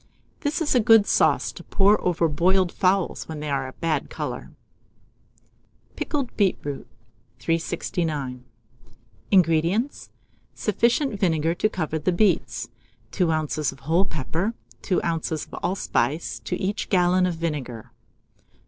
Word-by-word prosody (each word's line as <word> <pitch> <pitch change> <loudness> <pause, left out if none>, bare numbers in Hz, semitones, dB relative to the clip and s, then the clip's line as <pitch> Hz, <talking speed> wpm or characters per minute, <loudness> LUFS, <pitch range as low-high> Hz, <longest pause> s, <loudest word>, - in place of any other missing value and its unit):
This 305 +2 -1
is 295 - +1
a 250 - +5
good 225 -2 +6
sauce - - +2
to - - -11
pour 205 +1 +3
over 170 -2 +2
boiled 180 +4 +2
fowls 185 0 +1
when 160 -2 -6
they 150 -1 -4
are 135 -1 -1
a 130 - -9
bad 165 -2 -1
colour. - - -5 1.5
PICKLED 280 -5 -3
BEETROOT. 180 -8 -1 0.5
369. 160 -5 -2 0.9
INGREDIENTS. 180 - +2 0.5
Sufficient 235 - +1
vinegar 165 -3 +2
to 215 +5 +1
cover 160 -5 -2
the 160 +5 +1
beets, 195 +4 +1 0.4
2 180 -4 +1
oz. 155 -2 0
of 140 - -15
whole 165 +7 +2
pepper, 165 - -2 0.3
2 185 - 0
oz. 165 -1 -1
of - - -23
allspice 170 -4 -1
to 180 - -4
each 200 +2 -2
gallon 180 -1 +3
of 175 - -2
vinegar. 145 -9 -4
175 Hz, 130 wpm, -24 LUFS, 155-195 Hz, 1.5 s, good